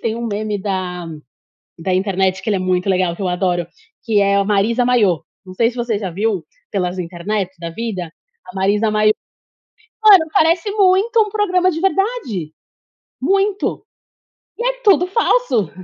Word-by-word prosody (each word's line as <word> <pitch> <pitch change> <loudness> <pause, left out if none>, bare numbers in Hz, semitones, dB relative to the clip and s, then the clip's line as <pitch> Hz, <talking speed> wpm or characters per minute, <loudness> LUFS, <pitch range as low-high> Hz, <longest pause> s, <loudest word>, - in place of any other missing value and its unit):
tem 225 -1 -2
um 235 0 -4
meme 210 -1 -2
da 185 -3 -3 0.7
da 185 +2 -1
internet 190 0 0
que - - -5
ele 205 - +2
é - - -1
muito 185 +1 0
legal 185 -2 +1
que 200 - -7
eu 185 - 0
adoro, 180 -1 0 0.4
que 220 -4 +2
é 200 0 +3
a 200 - +2
Marisa 215 +4 +1
Mayô, 210 -10 +2 0.2
não 185 - -10
sei 230 +4 +2
se 250 - -15
você 235 -3 -1
já 195 -3 -4
viu 195 -1 -1 0.3
pelas 180 -2 -2
internet 180 +3 -3
da 170 -1 -5
vida 185 -3 -5 0.4
a 240 - -12
Marisa 205 +3 +1
Mayô, 215 0 +3 0.9
mano 390 -6 +8
parece 335 +5 +2
muito 405 +3 +3
um 425 - 0
programa 370 -3 +1
de 325 - -4
verdade, 385 - -1 0.7
muito, 395 +1 0 0.7
e 475 - -2
é - - -1
tudo 390 -5 +4
falso, 370 - +1
215 Hz, 165 wpm, -18 LUFS, -, 0.9 s, mano